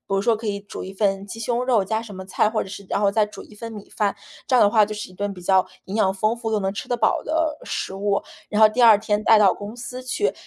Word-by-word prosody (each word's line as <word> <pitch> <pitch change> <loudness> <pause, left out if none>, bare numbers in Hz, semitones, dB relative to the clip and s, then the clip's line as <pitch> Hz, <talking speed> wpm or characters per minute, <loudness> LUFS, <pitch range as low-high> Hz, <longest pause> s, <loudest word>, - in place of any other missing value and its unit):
如 - - +2
说 230 +2 +2
可 220 0 -6
以 200 -1 -2
煮 200 - -8
1 190 - -7
份 195 -1 0
鸡 225 - -8
胸 240 +2 -1
肉 245 -5 +2
加 220 +2 -1
什 215 -4 -10
么 190 0 -8
菜， 205 +3 +1
或 220 - -1
者 - - -11
是 200 0 -9
然 - - 0
后 200 -1 +3
再 215 0 +3
煮 210 - -11
1 - - -16
份 230 +2 -7
米 210 -2 -10
饭， 205 -2 0 0.3
这 255 - +3
样 - - +6
的 205 - +5
话 215 0 +5
就 215 - -6
是 210 -2 -6
一 - - -16
顿 200 +2 -3
比 180 - -11
较 190 0 +3 0.2
营 190 - -5
养 195 -3 +3
丰 215 +4 0
富 225 -1 -4
又 215 - +1
能 195 0 -2
吃 - - -6
得 245 - 0
饱 220 - +2
的 315 -1 0
食 190 - -4
物， 200 0 0 0.3
然 210 - 0
后 215 - +10
第 245 +3 -1
2 225 -3 +8
天 210 -1 -1
带 220 0 +6
到 200 -3 +5
公 205 +3 -8
司 250 +1 -7
去。 255 +12 -1
210 Hz, 310 characters per minute, -23 LUFS, 200-230 Hz, 0.3 s, 后